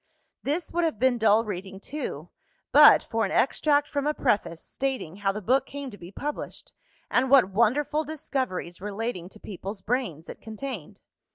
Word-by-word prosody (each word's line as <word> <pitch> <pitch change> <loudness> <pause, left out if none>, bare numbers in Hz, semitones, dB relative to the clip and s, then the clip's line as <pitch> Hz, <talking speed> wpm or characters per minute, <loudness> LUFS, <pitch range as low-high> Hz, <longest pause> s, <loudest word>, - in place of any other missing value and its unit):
This 305 +4 -2
would 345 0 +1
have 320 -9 0
been 245 +1 +2
dull 220 +1 +4
reading 195 -1 -6
too, 295 +9 -6 0.4
but - - +8
for 225 0 -1
an 200 - 0
extract 290 +5 +2
from 285 -1 -2
a 300 - +1
Preface, 195 - 0
stating 260 -11 -3
how 200 -1 +1
the 210 +1 -6
book 260 +6 +2
came 280 -2 -6
to - - -10
be 175 +1 -10
published, 290 +8 -6 0.4
and 255 +1 +2
what 255 -8 +6
wonderful 265 +9 +2
discoveries, 260 - -4
relating 205 -3 -4
to 215 - -15
peoples' 195 0 -7
brains, 205 - -2
it - - -9
contained. 220 - -7
230 Hz, 170 wpm, -26 LUFS, 195-275 Hz, 0.4 s, but